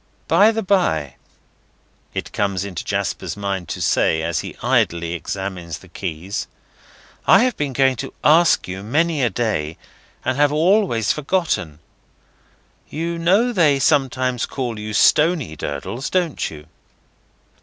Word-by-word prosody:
"By 195 Hz, +7 st, +5 dB
the 225 Hz, 0 st, -1 dB
bye," 130 Hz, -, +1 dB, 1.0 s
it -, -, -4 dB
comes 100 Hz, -2 st, -1 dB
into 95 Hz, -4 st, -5 dB
Jasper's -, -, -3 dB
mind 100 Hz, -4 st, -3 dB
to -, -, -4 dB
say, 80 Hz, 0 st, +2 dB
as 85 Hz, -1 st, -1 dB
he -, -, -7 dB
idly 85 Hz, 0 st, +1 dB
examines 90 Hz, -1 st, -5 dB
the 95 Hz, -, -17 dB
keys, 90 Hz, +1 st, -5 dB, 0.8 s
"I -, -, +7 dB
have 255 Hz, -2 st, +1 dB
been 145 Hz, -2 st, -2 dB
going 130 Hz, 0 st, +2 dB
to 135 Hz, -, -5 dB
ask 165 Hz, +3 st, +4 dB
you, 95 Hz, +1 st, -5 dB
many 150 Hz, +8 st, 0 dB
a 120 Hz, -, +3 dB
day, 100 Hz, -11 st, -2 dB, 0.5 s
and 130 Hz, -, 0 dB
have 145 Hz, 0 st, +4 dB
always 160 Hz, -, +2 dB
forgotten. 150 Hz, -, -1 dB, 1.1 s
You 170 Hz, +2 st, -3 dB
know 200 Hz, +9 st, +3 dB
they 155 Hz, -8 st, +4 dB
sometimes 130 Hz, -4 st, +1 dB
call 120 Hz, -5 st, -4 dB
you 105 Hz, 0 st, -5 dB
Stony 155 Hz, -, +3 dB
Durdles, 95 Hz, -, -5 dB
don't 175 Hz, -5 st, -1 dB
you?" 75 Hz, -1 st, -11 dB
125 Hz, 135 wpm, -20 LUFS, -, 1.1 s, I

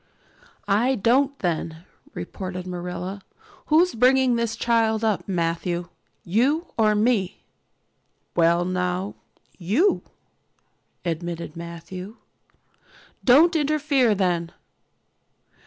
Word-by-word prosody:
"I 230 Hz, +6 st, +2 dB
don't 265 Hz, +6 st, +2 dB
then," 165 Hz, -3 st, -3 dB, 0.3 s
retorted 185 Hz, -1 st, -6 dB
Marilla. 180 Hz, +2 st, -5 dB, 0.5 s
"Who's 335 Hz, +3 st, +4 dB
bringing 255 Hz, +1 st, +4 dB
this 235 Hz, -1 st, -1 dB
child 225 Hz, -2 st, +1 dB
up, 215 Hz, -3 st, 0 dB
Matthew, 170 Hz, -1 st, -2 dB, 0.3 s
you 270 Hz, -, 0 dB
or 215 Hz, -2 st, +3 dB
me?" 210 Hz, -4 st, 0 dB, 0.9 s
"Well 170 Hz, +1 st, +3 dB
now, 180 Hz, +2 st, -2 dB, 0.5 s
you," 235 Hz, -, +2 dB, 1.0 s
admitted 170 Hz, -1 st, -4 dB
Matthew. 170 Hz, +4 st, -8 dB, 1.1 s
"Don't 315 Hz, +7 st, +6 dB
interfere 290 Hz, -6 st, +2 dB
then." 175 Hz, -3 st, 0 dB
200 Hz, 85 wpm, -24 LUFS, 175-250 Hz, 1.1 s, Don't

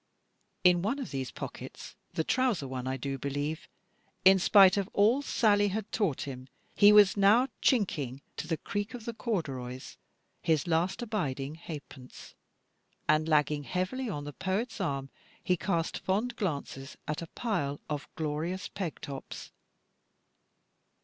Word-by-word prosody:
In 180 Hz, -1 st, +6 dB
one 220 Hz, +9 st, 0 dB
of 270 Hz, -, -5 dB
these 135 Hz, -2 st, -3 dB
pockets, -, -, -8 dB, 0.2 s
the 160 Hz, -, +1 dB
trouser 240 Hz, -, +1 dB
one 130 Hz, -1 st, -4 dB
I 130 Hz, 0 st, -1 dB
do 135 Hz, +1 st, -4 dB
believe, 145 Hz, +4 st, -3 dB, 0.6 s
in 190 Hz, 0 st, +8 dB
spite 190 Hz, 0 st, +7 dB
of 200 Hz, -2 st, -1 dB
all 225 Hz, +7 st, +4 dB
Sally 205 Hz, -7 st, +3 dB
had 205 Hz, +1 st, -3 dB
taught 195 Hz, -, 0 dB
him, 130 Hz, -3 st, -6 dB, 0.3 s
he 205 Hz, 0 st, +7 dB
was 210 Hz, -2 st, +7 dB
now 210 Hz, +6 st, +5 dB
chinking, 145 Hz, -, +1 dB
to -, -, -4 dB
the 160 Hz, -1 st, 0 dB
creak 205 Hz, +8 st, -4 dB
of 235 Hz, -3 st, -9 dB
the 235 Hz, -, -3 dB
corduroys, 135 Hz, -, -4 dB, 0.4 s
his 160 Hz, -3 st, +2 dB
last 175 Hz, +7 st, 0 dB
abiding 150 Hz, -, -2 dB
halfpence, 145 Hz, -5 st, -10 dB, 0.7 s
and 155 Hz, +1 st, +3 dB
lagging 150 Hz, -1 st, +3 dB
heavily 185 Hz, -, -2 dB
on 145 Hz, -7 st, -4 dB
the 145 Hz, 0 st, -7 dB
poet's 200 Hz, -, -2 dB
arm, 135 Hz, -6 st, -2 dB, 0.3 s
he 180 Hz, -, +2 dB
cast 170 Hz, -1 st, -1 dB
fond 220 Hz, +6 st, -1 dB
glances 140 Hz, -, -4 dB
at 150 Hz, +1 st, -2 dB
a 165 Hz, -, -6 dB
pile 170 Hz, -, -1 dB
of 150 Hz, -1 st, -4 dB
glorious 165 Hz, +5 st, -3 dB
peg 180 Hz, -6 st, -4 dB
tops. 135 Hz, -2 st, -7 dB
170 Hz, 145 wpm, -30 LUFS, 145-205 Hz, 0.7 s, in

